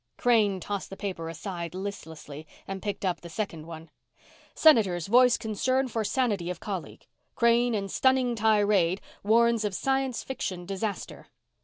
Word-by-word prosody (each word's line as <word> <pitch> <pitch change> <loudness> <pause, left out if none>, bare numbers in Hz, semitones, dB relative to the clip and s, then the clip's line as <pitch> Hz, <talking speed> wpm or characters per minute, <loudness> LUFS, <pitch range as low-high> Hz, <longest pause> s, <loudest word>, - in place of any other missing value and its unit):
Crane 215 -6 +3
tossed 200 +1 -4
the 195 - -9
paper 185 -6 -4
aside 170 +1 -6
listlessly 160 -6 -7 0.2
and 195 -1 -5
picked 205 -1 -4
up 180 -2 -1
the 170 - -9
second 165 -5 -5
one: 165 -1 -10 0.6
SENATORS 205 - +4
VOICE 245 +3 +5
CONCERN 255 +5 0
FOR 225 -1 -1
SANITY 210 -7 0
OF 180 -2 -4
COLLEAGUE 190 -5 -6 0.3
CRANE 235 0 +3
IN 200 -1 -2
STUNNING 260 +3 +2
TIRADE 205 -5 +2 0.2
WARNS 230 +1 +3
OF 205 -3 -2
SCIENCE 270 -2 -1
FICTION 185 -9 -4
DISASTER. 195 +1 -5
205 Hz, 145 wpm, -27 LUFS, 180-235 Hz, 0.6 s, VOICE